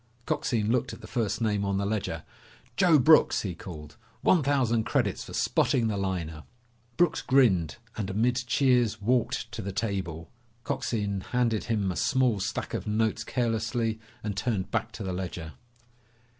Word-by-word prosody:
Coxine 115 Hz, -8 st, 0 dB
looked 125 Hz, +1 st, 0 dB
at -, -, -10 dB
the -, -, -9 dB
first 110 Hz, -2 st, -2 dB
name 105 Hz, -3 st, +1 dB
on 100 Hz, -1 st, 0 dB
the 100 Hz, -, 0 dB
ledger. 105 Hz, 0 st, -2 dB, 0.5 s
"Joe 175 Hz, -2 st, +5 dB
Brooks!" 155 Hz, +4 st, +5 dB
he 95 Hz, -4 st, -3 dB
called. 75 Hz, -4 st, -10 dB, 0.2 s
"One 180 Hz, -, +4 dB
thousand 130 Hz, -5 st, +2 dB
credits -, -, 0 dB
for -, -, -10 dB
spotting 115 Hz, -3 st, +2 dB
the 105 Hz, -, -1 dB
liner!" 90 Hz, -5 st, -3 dB, 0.6 s
Brooks 175 Hz, -2 st, +3 dB
grinned 100 Hz, -, +3 dB, 0.2 s
and 105 Hz, -3 st, -3 dB
amid 115 Hz, +5 st, +1 dB
cheers 125 Hz, -5 st, +3 dB
walked 120 Hz, +3 st, 0 dB
to 110 Hz, -, -5 dB
the 100 Hz, 0 st, -4 dB
table. 95 Hz, -6 st, -3 dB, 0.3 s
Coxine 100 Hz, -4 st, -2 dB
handed 115 Hz, -1 st, 0 dB
him 105 Hz, -5 st, 0 dB
a -, -, -5 dB
small 125 Hz, -2 st, +2 dB
stack 95 Hz, -, -3 dB
of -, -, -3 dB
notes 110 Hz, +1 st, 0 dB
carelessly 115 Hz, -2 st, -1 dB, 0.2 s
and 105 Hz, -2 st, -3 dB
turned 105 Hz, -3 st, -1 dB
back -, -, -1 dB
to -, -, -6 dB
the 95 Hz, -1 st, -3 dB
ledger. 90 Hz, -4 st, -5 dB
110 Hz, 160 wpm, -28 LUFS, 95-120 Hz, 0.6 s, Joe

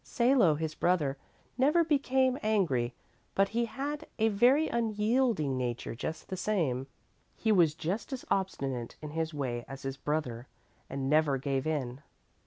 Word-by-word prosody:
"Salo, 235 Hz, -, +3 dB
his 155 Hz, +1 st, -3 dB
brother, 160 Hz, -6 st, +1 dB, 0.4 s
never 300 Hz, +6 st, +5 dB
became 265 Hz, -4 st, +2 dB
angry, 160 Hz, -, +1 dB, 0.4 s
but 195 Hz, 0 st, +3 dB
he 235 Hz, +1 st, 0 dB
had 290 Hz, +6 st, -4 dB
a 225 Hz, 0 st, +3 dB
very 250 Hz, +9 st, +4 dB
unyielding 220 Hz, -, +1 dB
nature 120 Hz, -2 st, -3 dB
just 160 Hz, +7 st, -5 dB
the 190 Hz, -, -2 dB
same. 160 Hz, -11 st, 0 dB, 0.5 s
He 220 Hz, -, +1 dB
was 170 Hz, -7 st, +4 dB
just 180 Hz, -, -3 dB
as 260 Hz, -2 st, -5 dB
obstinate 135 Hz, -11 st, -1 dB
in 150 Hz, -, -5 dB
his 160 Hz, +1 st, -2 dB
way 130 Hz, -5 st, -3 dB
as 135 Hz, 0 st, -8 dB
his 135 Hz, 0 st, -4 dB
brother, 135 Hz, -4 st, -2 dB, 0.4 s
and 135 Hz, -1 st, -3 dB
never 150 Hz, -1 st, +3 dB
gave 135 Hz, +1 st, -1 dB
in. 135 Hz, -4 st, -2 dB
160 Hz, 150 wpm, -30 LUFS, -, 0.5 s, never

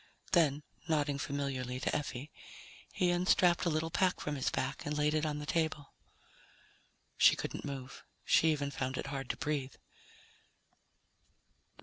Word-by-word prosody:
Then, 150 Hz, -4 st, +3 dB, 0.2 s
nodding 145 Hz, -3 st, +1 dB
familiarly 135 Hz, -3 st, -3 dB
to -, -, 0 dB
Effie, 145 Hz, 0 st, -4 dB, 0.6 s
he 180 Hz, -1 st, +2 dB
unstrapped 175 Hz, 0 st, +3 dB
a -, -, +3 dB
little 160 Hz, +1 st, -1 dB
pack 185 Hz, +1 st, +2 dB
from 150 Hz, -, -3 dB
his 135 Hz, -, 0 dB
back 135 Hz, +2 st, -2 dB
and 150 Hz, 0 st, -2 dB
laid 150 Hz, 0 st, +2 dB
it 155 Hz, 0 st, +1 dB
on 150 Hz, -1 st, -2 dB
the 150 Hz, -, -5 dB
table. 155 Hz, -2 st, -1 dB, 1.3 s
She -, -, +7 dB
couldn't -, -, -5 dB
move. 135 Hz, -2 st, -7 dB, 0.2 s
She 160 Hz, -, +5 dB
even 145 Hz, -2 st, -1 dB
found 130 Hz, -1 st, -3 dB
it -, -, -3 dB
hard 135 Hz, -2 st, -4 dB
to -, -, -2 dB
breathe. 140 Hz, -3 st, -2 dB
150 Hz, 145 wpm, -33 LUFS, 135-160 Hz, 1.3 s, She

